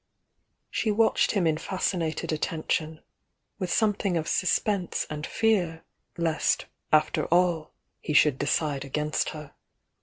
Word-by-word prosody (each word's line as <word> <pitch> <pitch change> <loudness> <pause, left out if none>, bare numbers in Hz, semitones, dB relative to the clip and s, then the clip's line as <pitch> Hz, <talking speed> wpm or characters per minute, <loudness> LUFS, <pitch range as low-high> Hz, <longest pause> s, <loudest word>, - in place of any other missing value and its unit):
She 220 - 0
watched 220 +2 +3
him 195 -5 +1
in 160 -1 +1
fascinated 175 -4 -2
attention, 155 0 -2 0.6
with 185 -3 -2
something 205 -4 +1
of 160 0 -2
suspense 190 0 0
and 150 0 -4
fear 185 -8 +1 0.3
lest 165 -2 +1 0.3
after 155 0 +3
all 175 -2 +2 0.3
he 150 - -4
should 145 -2 +4
decide 145 0 0
against 150 +2 -1
her. 150 -2 -9
160 Hz, 120 wpm, -27 LUFS, 155-185 Hz, 0.6 s, should